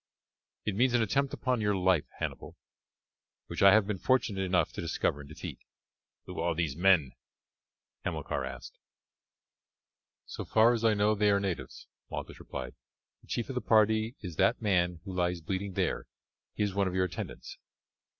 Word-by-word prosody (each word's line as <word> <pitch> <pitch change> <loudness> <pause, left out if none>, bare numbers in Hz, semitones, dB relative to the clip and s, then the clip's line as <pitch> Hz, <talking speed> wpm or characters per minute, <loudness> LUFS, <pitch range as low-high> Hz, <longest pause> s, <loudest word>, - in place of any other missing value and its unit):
"It 105 - -1
means 125 +3 +3
an 120 - +4
attempt 135 +6 +1
upon 125 -3 -1
your 105 -1 +2
life, 90 -4 +2
Hannibal, - - -5 0.9
which - - -5
I 100 - +9
have 110 0 +5
been 100 -2 -3
fortunate 115 -6 +1
enough 95 -1 +1
to - - -5
discover 70 - -1
and 70 -1 -10
defeat." 75 - -7 0.7
"Who - - -7
are 85 -1 0
these 80 -5 -1
men?" 85 -6 +4 0.9
Hamilcar - - -2
asked. - - -8 1.5
"So - - -6
far 115 +2 +4
as 115 -1 -2
I 110 -1 +4
know 105 +1 +3
they 105 0 +2
are 100 0 +4
natives," 95 -4 -4 0.2
Malchus - - -6
replied. 65 -1 -6 0.5
"The - - -22
chief 120 - -2
of - - -3
the 125 - -2
party 110 +1 +3
is 90 -6 -7
that - - +3
man 90 -5 +1
who 95 -1 -7
lies 90 -1 0
bleeding 95 +4 -3
there; - - -1 0.5
he - - 0
is 100 -2 -1
one 100 0 +1
of 90 - -3
your 95 0 +3
attendants." 90 - -7
100 Hz, 170 wpm, -30 LUFS, 90-110 Hz, 1.5 s, I